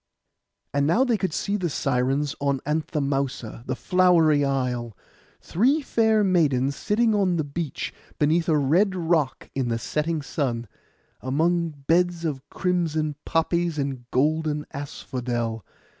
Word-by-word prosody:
And 140 0 +2
now 220 +11 +4
they 245 -3 +2
could 190 -4 -1
see 200 +6 -1
the 180 -4 -1
Sirens 135 +1 0
on 140 -1 +1
Anthemousa, 140 -6 -2
the 130 - -1
flowery 170 -3 +4
isle; 125 -5 -1 0.4
three 270 - +2
fair 220 -4 +3
maidens 140 -8 +2
sitting 220 +5 +1
on 195 -4 +2
the 160 - 0
beach, 145 +1 -4 0.2
beneath 160 +3 +2
a 155 - +4
red 175 +8 +2
rock 165 -6 0
in 135 -2 -1
the 115 - 0
setting 150 +6 -2
sun, 120 -4 -2 0.5
among 160 +2 0
beds 170 +1 +2
of 145 -4 -2
crimson 160 -5 -1
poppies 170 0 0
and 135 -4 -3
golden 150 +2 +1
asphodel. 120 -5 -4
150 Hz, 130 wpm, -25 LUFS, 135-175 Hz, 0.5 s, now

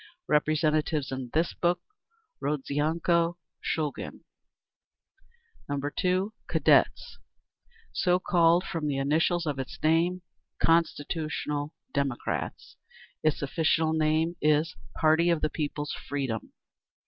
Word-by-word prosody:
Representatives 150 -1 +1
in 130 -2 -4
this 165 +2 +1
book, 175 0 +1 0.6
Rodzianko, 160 +4 +1 0.3
Shulgin. 150 -3 -3 1.5
2. 180 +8 0
Cadets. - - +2 0.7
So 180 -1 +3
called 175 -1 +3
from 165 -6 -3
the 140 -2 -1
initials 160 +5 +1
of 145 -3 -2
its 130 - -5
name, 170 +3 +2 0.3
Constitutional 155 -2 0 0.2
Democrats. 140 -3 -3 0.4
Its 155 -2 +1
official 160 +2 +1
name 160 +2 +1
is 155 +2 +2 0.2
"Party 160 +2 +4
of 170 -2 +2
the 155 - 0
People's 145 -1 -3
Freedom." 135 -6 -4
155 Hz, 95 wpm, -28 LUFS, 145-170 Hz, 1.5 s, Party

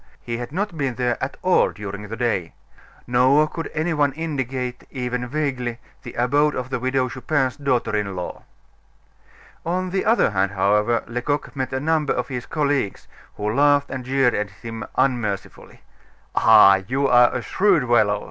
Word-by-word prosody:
He 115 -1 -5
had 120 +1 -6
not 195 +2 -2
been 135 -4 -1
there 125 -1 0
at 130 - -4
all 185 - +4
during 100 0 -7
the 115 +2 -6
day. 115 -9 -1 0.5
Nor 130 +5 +4
could 165 +1 -6
any 160 +2 -1
one 145 -3 +1
indicate, 130 -5 -4
even 125 -1 -3
vaguely, 130 -4 -2 0.2
the 125 -3 -10
abode 145 +5 +2
of 130 +1 -5
the - - -1
Widow 130 +1 0
Chupin's 130 0 -1
daughter 130 -6 0
in 100 -2 -2
law. 90 -1 -6 1.2
On 180 +2 -2
the 190 0 0
other 225 - +3
hand, 100 0 0
however, 105 +4 +2
Lecoq 125 +6 -3
met 130 -1 -3
a 130 - -1
number 155 0 +1
of 125 -1 -3
his 125 -2 -5
colleagues, 145 -8 -1 0.3
who 105 +1 -2
laughed 145 +1 +3
and 130 -1 -4
jeered 135 -1 +2
at 105 -1 -2
him 115 +3 -8
unmercifully. 110 -7 -2 0.5
"Ah! 95 0 +6
you 135 +3 +1
are 125 -1 +5
a 125 - -3
shrewd 185 - +2
fellow!" 110 -4 +3
125 Hz, 165 wpm, -22 LUFS, 115-145 Hz, 1.2 s, Ah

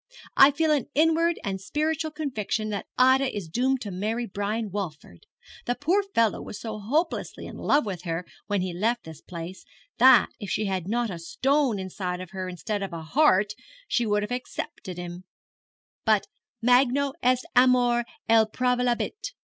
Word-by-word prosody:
'I 275 +1 +8
feel 315 +2 +2
an 290 -6 +1
inward 325 +2 +3
and 195 -1 -3
spiritual 315 +6 -1
conviction 245 -8 -3
that 205 -1 -4
Ida 260 0 +4
is 190 -5 -5
doomed 255 +9 0
to 205 - -5
marry 215 +6 -2
Brian 205 +1 -3
Walford. 155 - -6 0.4
The 245 - +1
poor 345 +10 +2
fellow 230 - +1
was - - -8
so 220 -2 -5
hopelessly 300 - -1
in - - -8
love 290 -3 +2
with 190 -5 -4
her 170 0 -3 0.2
when 205 -2 0
he 180 -1 -3
left 230 +7 0
this 160 -1 -11
place, 175 +1 -8 0.4
that, 255 -3 +7
if 205 - -6
she 215 - 0
had 190 -3 -2
not 235 +1 0
a 175 - -6
stone 270 - +1
inside 185 -1 -4
her 185 -2 -4
instead 190 +4 -4
of 195 -2 -4
a 165 -1 -5
heart, 205 - +3 0.3
she 240 -3 +1
would 210 0 +1
have 210 - -5
accepted 245 -6 -5
him; 175 +1 -7 0.8
but 215 -3 +3 0.4
_magno 265 +2 +4
est 255 +1 +2
amor 245 -1 +4 0.2
et 220 -1 +4
praevalebit! 250 - 0
225 Hz, 165 wpm, -26 LUFS, 190-260 Hz, 0.8 s, I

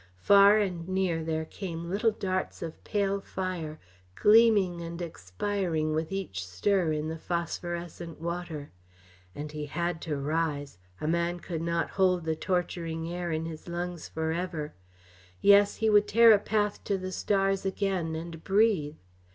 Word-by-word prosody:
Far 200 - +7
and 180 -5 -1
near 185 -4 0
there 160 0 -2
came 170 -1 -6
little 205 +6 +2
darts 185 -4 -3
of 160 -1 -7
pale 200 -1 0
fire, 180 -6 -4 0.4
gleaming 210 -5 +5
and 170 0 -6
expiring 160 - -2
with 160 +2 -2
each 185 - -3
stir 165 - +1
in 155 0 -1
the 160 0 -5
phosphorescent 170 -1 -4
water. 170 -3 -5 0.6
And 150 +1 -6
he 150 -1 -5
had 170 +2 -2
to 150 -3 -3
rise; 145 - -2 0.2
a - - -3
man 170 +2 0
could 170 -2 -5
not 170 0 -1
hold 185 -2 +2
the 160 0 0
torturing 170 -2 -2
air 175 -1 -3
in 160 0 -1
his 160 0 -8
lungs 175 -1 -4
for 160 0 -2
ever. 165 -3 -3 0.7
Yes, 200 0 +6
he 220 - +1
would 210 0 +5
tear 230 +1 +7
a 210 - +6
path 210 0 -1
to 200 - 0
the 185 0 -5
stars 195 0 +1
again 190 -4 -1
and 165 0 -7
breathe. 195 -7 +2
170 Hz, 155 wpm, -29 LUFS, 160-195 Hz, 0.7 s, Far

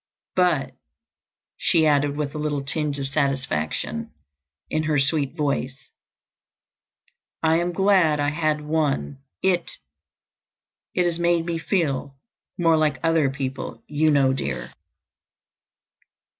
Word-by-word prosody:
But," 180 -6 +2 0.8
she 160 -2 +3
added, 145 -1 +2
with 145 -2 -2
a 150 - -4
little 150 -2 -1
tinge 145 0 -1
of 135 -1 -2
satisfaction 135 - -1 0.6
in 155 - 0
her 155 -1 +1
sweet 140 +1 +1
voice, 140 -3 -2 1.5
"I 160 0 +4
am 175 +1 0
glad 185 -5 +3
I 145 0 +2
had 150 0 0
one. 150 - -1 0.2
It—it 180 0 -5
has 170 -1 -1
made 170 -1 +2
me 170 -1 -2
feel 145 -7 -1 0.4
more 165 -2 +4
like 155 -3 +2
other 165 -4 +3
people, 135 -1 -5
you 155 +1 +1
know, 140 -3 +4
dear." 130 - -4
150 Hz, 115 wpm, -24 LUFS, 140-165 Hz, 1.5 s, I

